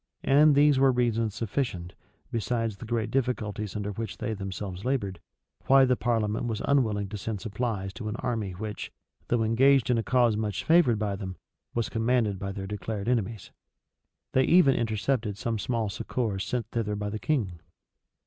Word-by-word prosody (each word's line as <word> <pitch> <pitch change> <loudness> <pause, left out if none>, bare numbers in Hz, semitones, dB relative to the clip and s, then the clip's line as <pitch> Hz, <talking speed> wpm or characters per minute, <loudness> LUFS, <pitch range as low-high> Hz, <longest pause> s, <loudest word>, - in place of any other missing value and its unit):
[] - - -43
And 145 +2 +5
these 145 -1 +5
were 135 0 +5
reasons 115 -3 0
sufficient, 105 -6 -3 0.4
besides 115 -2 -1
the 115 - -8
great 115 -1 -1
difficulties 110 -6 -2
under 105 0 -2
which 110 +1 -5
they 110 - -2
themselves 95 -1 -5
labored, 100 -9 -1 0.5
why 135 0 +7
the 125 -1 +3
parliament 115 -2 0
was 110 -2 -2
unwilling 110 -8 +2
to 105 0 -6
send 105 +1 -3
supplies 105 -2 -3
to 110 -1 -5
an 105 - -3
army 110 -6 -2
which, 105 +3 -6 0.4
though 120 -2 +1
engaged 130 +4 +4
in 120 - +3
a - - -1
cause 120 -3 +3
much 105 -2 -2
favored 160 -9 +4
by 105 -2 -1
them, 95 -2 -6 0.4
was 115 -1 0
commanded 115 -3 +1
by 95 0 -3
their 95 -1 -5
declared 105 +1 -4
enemies. 115 -4 -1 0.8
They 130 0 +4
even 170 -6 +6
intercepted 110 -1 -1
some 115 +1 -2
small 115 -1 -1
succors 100 0 -2
sent 125 -3 -2
thither 105 -3 -1
by 105 0 -3
the 110 - -4
king. 105 - -1
110 Hz, 175 wpm, -28 LUFS, 105-125 Hz, 0.8 s, why